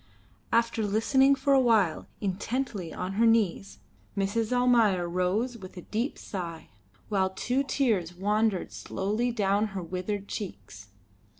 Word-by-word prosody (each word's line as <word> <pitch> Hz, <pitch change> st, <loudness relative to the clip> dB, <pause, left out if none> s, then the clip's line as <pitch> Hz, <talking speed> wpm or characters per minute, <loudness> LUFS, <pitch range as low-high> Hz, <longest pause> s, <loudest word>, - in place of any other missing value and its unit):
After 230 Hz, -1 st, +2 dB
listening 245 Hz, +7 st, +3 dB
for 275 Hz, +1 st, +1 dB
a 270 Hz, -, +6 dB
while 220 Hz, -10 st, +2 dB
intently 205 Hz, -1 st, -2 dB
on 180 Hz, +3 st, -4 dB
her -, -, +6 dB
knees, 210 Hz, -4 st, +1 dB, 0.4 s
Mrs. 210 Hz, +3 st, 0 dB
Almayer 230 Hz, -8 st, +3 dB
rose 190 Hz, +8 st, -1 dB
with 185 Hz, -1 st, -11 dB
a 180 Hz, -, -7 dB
deep 235 Hz, +7 st, -2 dB
sigh, 170 Hz, -4 st, -6 dB, 0.4 s
while 190 Hz, -3 st, +2 dB
two 250 Hz, +7 st, -1 dB
tears 230 Hz, -, 0 dB
wandered 210 Hz, +1 st, 0 dB
slowly 215 Hz, +6 st, -2 dB
down 205 Hz, -1 st, +1 dB
her 185 Hz, -, -3 dB
withered 185 Hz, +4 st, -4 dB
cheeks. 100 Hz, -, -7 dB
210 Hz, 130 wpm, -28 LUFS, 185-235 Hz, 0.4 s, a